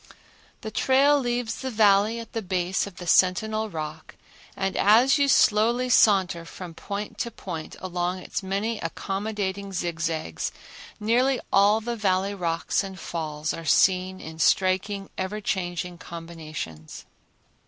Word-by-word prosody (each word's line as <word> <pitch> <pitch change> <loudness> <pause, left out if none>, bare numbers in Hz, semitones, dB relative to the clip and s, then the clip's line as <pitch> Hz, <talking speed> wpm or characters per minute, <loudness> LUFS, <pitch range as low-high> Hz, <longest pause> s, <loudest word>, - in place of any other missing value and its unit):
The 220 - -6
trail 275 +5 +4
leaves 240 -3 -2
the 265 - -3
Valley 210 0 +3
at 230 - -10
the 225 - -2
base 185 0 -1
of 195 - -11
the 180 - -8
Sentinel 215 +5 +2
Rock, 155 -2 -7 0.4
and 195 0 -1
as 240 +8 +5
you 280 - +3
slowly 240 0 +3
saunter 190 -7 +4
from 170 +1 -9
point 200 +5 -6
to 235 - -1
point 170 -8 -7
along 180 0 -2
its 185 - -5
many 200 +4 -2
accommodating 200 -1 -3
zigzags 170 -3 -2 0.5
nearly 245 +5 +2
all 205 +3 +5
the 235 +2 -3
Valley 195 -2 0
rocks 170 -1 -1
and 190 -1 -8
falls 155 -2 -3
are 165 - -6
seen 185 +4 +3
in 160 0 -9
striking, 195 +3 +1
ever 190 +3 -3
changing 180 -3 -3
combinations. 155 - -8
195 Hz, 135 wpm, -25 LUFS, 175-220 Hz, 0.5 s, as